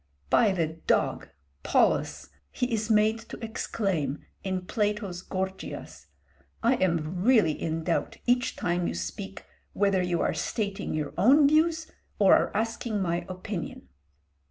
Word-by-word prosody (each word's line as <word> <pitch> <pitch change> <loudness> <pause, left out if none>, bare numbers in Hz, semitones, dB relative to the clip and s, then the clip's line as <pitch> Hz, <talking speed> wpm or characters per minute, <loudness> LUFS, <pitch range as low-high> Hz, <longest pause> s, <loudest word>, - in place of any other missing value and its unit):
"By 220 -4 +5
the 175 -4 +1
dog! 160 +1 -1 0.3
Polus," - - +1 0.2
he 250 -1 -2
is 220 0 -1
made 215 +1 +3
to - - -7
exclaim 195 - -2 0.2
in 185 -1 -2
Plato's 205 -4 -1
'Gorgias,' 185 - -5 0.6
"I 235 +3 +4
am 170 -1 0
really 220 -9 +5
in 160 +1 -3
doubt 170 0 -1
each 245 0 +2
time 175 0 -1
you - - -3
speak 85 0 -6 0.3
whether 200 -2 +2
you 175 -2 0
are - - +1
stating 200 -6 -2
your 150 -2 -3
own 280 +9 +6
views 320 +2 +3 0.3
or 195 -2 +6
are - - +2
asking 225 0 -2
my 175 -1 -1
opinion." 185 - -6
190 Hz, 135 wpm, -27 LUFS, 170-220 Hz, 0.6 s, own